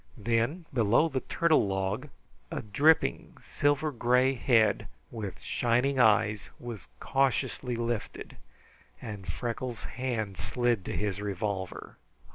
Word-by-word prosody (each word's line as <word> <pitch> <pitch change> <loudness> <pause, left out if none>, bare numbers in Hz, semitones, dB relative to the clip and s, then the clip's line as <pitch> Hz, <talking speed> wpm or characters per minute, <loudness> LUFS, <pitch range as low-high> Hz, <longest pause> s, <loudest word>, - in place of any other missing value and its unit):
Then, 120 - 0
below 120 +6 +3
the 135 - -1
turtle 160 -5 +2
log, 95 +8 -2 0.4
a - - -4
dripping 140 - +2
silver 145 +1 0
gray 125 +1 +3
head, 110 -5 +2 0.2
with 105 -5 -6
shining 125 +3 +1
eyes, 105 -2 +3
was 115 -9 -7
cautiously 135 -2 0
lifted, 115 -2 -4 0.6
and 100 -5 -6
Freckles' 120 +2 -4
hand 115 -6 -3
slid 120 -5 0
to - - -3
his 105 -1 -2
revolver. 100 -2 -4
115 Hz, 110 wpm, -29 LUFS, 105-130 Hz, 0.6 s, below